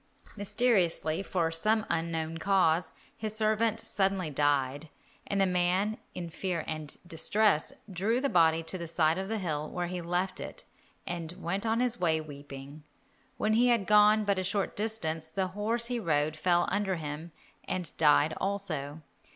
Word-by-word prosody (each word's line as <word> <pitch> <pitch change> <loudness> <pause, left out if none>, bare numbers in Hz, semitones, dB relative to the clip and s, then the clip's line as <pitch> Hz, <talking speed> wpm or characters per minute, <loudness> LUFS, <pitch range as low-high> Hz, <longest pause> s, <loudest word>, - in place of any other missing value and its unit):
Mysteriously, 195 -6 +1
from 170 -4 -1
some 215 +6 +2
unknown 165 -1 -2
cause, 180 -2 +2 0.2
his 215 -1 -3
servant 220 +1 +1
suddenly 195 -6 0
died, 145 +1 0 0.4
and 200 - -1
the 195 - +5
man, 185 +4 +1 0.2
in 175 - -4
fear 175 -1 -2
and 155 -2 -5
distress, 175 +1 +3 0.2
drew 205 +5 0
the 280 - +1
body 165 -6 +3
to 180 +3 -3
the 170 - -5
side 160 +1 +2
of 190 - -3
the 225 - -1
hill, 155 -6 -3
where 180 0 -3
he 180 0 -4
left 175 +2 -1
it - - -7 0.4
and 170 -1 -4
went 190 +4 -3
on 225 +2 +1
his 245 -1 0
way 160 -3 +2
weeping. 145 -1 -9 0.6
When 215 - +1
he 240 +3 +4
had 235 -5 +3
gone 210 +1 +5
but 200 -2 +1
a - - -1
short 195 +1 -1
distance, 175 -8 -2
the 185 +4 -2
horse 220 +5 0
he 245 0 -1
rode 155 -5 +1
fell 175 +2 +2
under 200 -1 0
him 155 +1 -6 0.3
and 180 -4 -3
died 155 0 +4
also. 160 -7 -3
180 Hz, 165 wpm, -30 LUFS, 160-205 Hz, 0.6 s, the